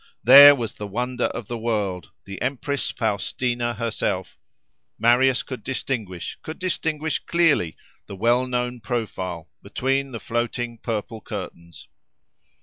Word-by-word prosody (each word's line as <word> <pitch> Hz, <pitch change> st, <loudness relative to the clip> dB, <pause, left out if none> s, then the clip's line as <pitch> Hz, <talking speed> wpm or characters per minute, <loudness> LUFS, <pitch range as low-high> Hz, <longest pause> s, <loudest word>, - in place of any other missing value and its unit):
there, 140 Hz, +3 st, +10 dB
was 120 Hz, -4 st, -4 dB
the 105 Hz, -, -7 dB
wonder 125 Hz, +4 st, -2 dB
of 115 Hz, -, -4 dB
the 120 Hz, -1 st, -4 dB
world—the 100 Hz, -3 st, -4 dB
empress 140 Hz, +2 st, -2 dB
Faustina 120 Hz, +2 st, -1 dB
herself: 105 Hz, -4 st, -2 dB, 0.6 s
Marius 125 Hz, +3 st, +3 dB
could 130 Hz, -4 st, -7 dB
distinguish, 110 Hz, -9 st, -4 dB
could 160 Hz, -, -7 dB
distinguish 160 Hz, -4 st, -1 dB
clearly, 160 Hz, -, +1 dB, 0.3 s
the 100 Hz, -, -7 dB
well 120 Hz, +5 st, +2 dB
known 125 Hz, 0 st, -2 dB
profile, 95 Hz, -7 st, -4 dB
between 135 Hz, +1 st, -1 dB
the 115 Hz, -, -5 dB
floating 120 Hz, 0 st, -3 dB
purple 110 Hz, 0 st, -4 dB
curtains. 85 Hz, -4 st, -8 dB
120 Hz, 120 wpm, -23 LUFS, 105-130 Hz, 0.6 s, there